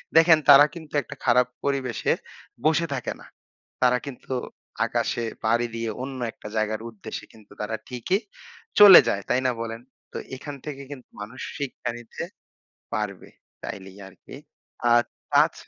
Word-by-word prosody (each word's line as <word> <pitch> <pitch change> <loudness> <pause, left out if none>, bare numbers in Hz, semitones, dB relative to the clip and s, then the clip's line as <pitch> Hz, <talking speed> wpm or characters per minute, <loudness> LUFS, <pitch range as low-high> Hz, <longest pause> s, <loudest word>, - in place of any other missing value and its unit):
দেখেন 165 0 +8
তারা 140 +1 +10
কিন্তু 160 -3 -11
একটা 145 - -10
খারাপ 125 0 +4 0.2
পরিবেশে 135 -4 0 0.5
বসে 160 +2 +3
থাকে 130 -3 -3
না। - - -13 0.6
তারা 125 0 +4
কিন্তু 130 -1 -7 0.5
আকাশে 120 - -1 0.2
পাড়ি 120 +2 +2
দিয়ে 115 -1 -2
অন্য 135 -1 -6
একটা - - -11
জায়গার 110 0 0
উদ্দেশ্যে 110 -4 -8
কিন্তু 110 -2 -19
তারা 105 +1 -2
ঠিকই 125 - 0 0.6
চলে 205 -3 +12
যায়। 100 -3 0
তাই 125 - +2
না, - - +3
বলেন? 115 0 -5 0.3
তো - - -4 0.2
এখান 145 +2 -7
থেকে 140 -2 -6
কিন্তু 130 -4 -10
মানুষ 115 +5 -8 0.2
শিক্ষা 140 -4 -4
নিতে 120 -1 -7 0.7
পারবে। - - -3 0.3
তাইলেই 95 0 -7
আরকি। 95 - -13 0.6
আর 120 0 +6 0.3
তাছ - - +5
125 Hz, 145 wpm, -25 LUFS, 115-140 Hz, 0.7 s, চলে